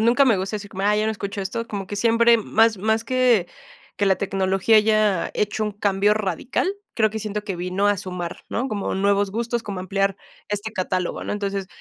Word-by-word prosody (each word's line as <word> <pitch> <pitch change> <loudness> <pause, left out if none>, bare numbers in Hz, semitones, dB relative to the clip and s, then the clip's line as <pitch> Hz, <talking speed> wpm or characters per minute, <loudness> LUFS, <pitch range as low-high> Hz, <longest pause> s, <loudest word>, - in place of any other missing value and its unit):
Nunca 240 +5 +4
me 230 -6 +4
gusta 195 +3 -2
decir 205 -1 -9
como, 195 - -5
ay, 210 +1 +3
yo 215 - 0
no 220 - +1
escucho 200 -1 -5
esto, 230 +4 -3
como 200 -3 -5
que 205 - -5
siempre 235 +1 +4
más 220 0 +2
más 220 +3 0
que 250 -7 +3 0.5
que 205 - +1
la 190 - +4
tecnología 195 +2 +2
haya 215 -3 +3
hecho 210 +1 -1
un 210 - 0
cambio 205 0 +2
radical, 215 - -1 0.2
creo 215 -2 +2
que 220 - -4
siento 210 0 -4
que 195 -3 -3
vino 180 +3 -1
a 205 - +3
sumar, 180 -2 -5
¿no? 250 +4 -2
Como 205 -3 -2
nuevos 200 0 +2
gustos, 235 +2 -2
como 200 -3 -5
ampliar 195 +1 0 0.3
este 210 +1 -3
catálogo, 185 -2 -2
¿no? - - -3
Entonces, 200 -2 -3
205 Hz, 210 wpm, -23 LUFS, 195-220 Hz, 0.5 s, Nunca